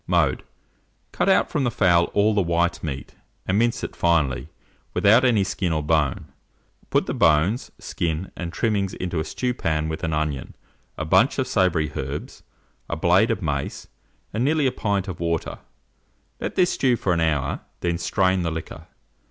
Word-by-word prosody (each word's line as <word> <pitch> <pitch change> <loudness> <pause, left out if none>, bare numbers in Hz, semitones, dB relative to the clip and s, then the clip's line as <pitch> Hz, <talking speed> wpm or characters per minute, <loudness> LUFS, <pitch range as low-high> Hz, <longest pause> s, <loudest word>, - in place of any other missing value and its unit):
Mode. - - +2 0.7
Cut - - 0
out 190 - +3
from 150 -4 0
the 120 - +2
fowl 90 -6 +3
all 105 +2 +4
the 105 - +2
white 85 0 0
meat, 70 -4 -5 0.3
and 95 +3 +1
mince 120 0 +1
it - - -5
finely 80 -7 +1 0.5
without 110 +5 +5
any 115 -6 +4
skin 95 -2 -2
or 80 -2 0
bone; 75 -3 +1 0.6
put - - +2
the - - -3
bones, 85 +9 +2
skin, 85 +2 -3
and 85 -1 -5
trimmings 100 -2 -1
into 90 -2 -3
a - - 0
stewpan 80 -6 -2
with 80 - -5
an 85 - -1
onion, 75 -3 -2 0.4
a 80 - -3
bunch 80 - +3
of - - +1
savoury 85 -5 +1
herbs, 70 +3 -5 0.5
a - - -1
blade 90 +7 +3
of 110 -4 -1
mace, 70 -3 -3 0.4
and 110 +3 0
nearly 150 +1 +2
a 130 - +3
pint 100 -4 -1
of 95 -3 -6
water; 85 -1 -2 0.8
let - - -4
this 180 - +3
stew 130 -3 +2
for 95 -5 0
an 85 - 0
hour, 75 -4 0 0.2
then 85 -1 -1
strain 95 0 +1
the 85 - -1
liquor. 80 0 -7
85 Hz, 175 wpm, -23 LUFS, 80-105 Hz, 0.8 s, without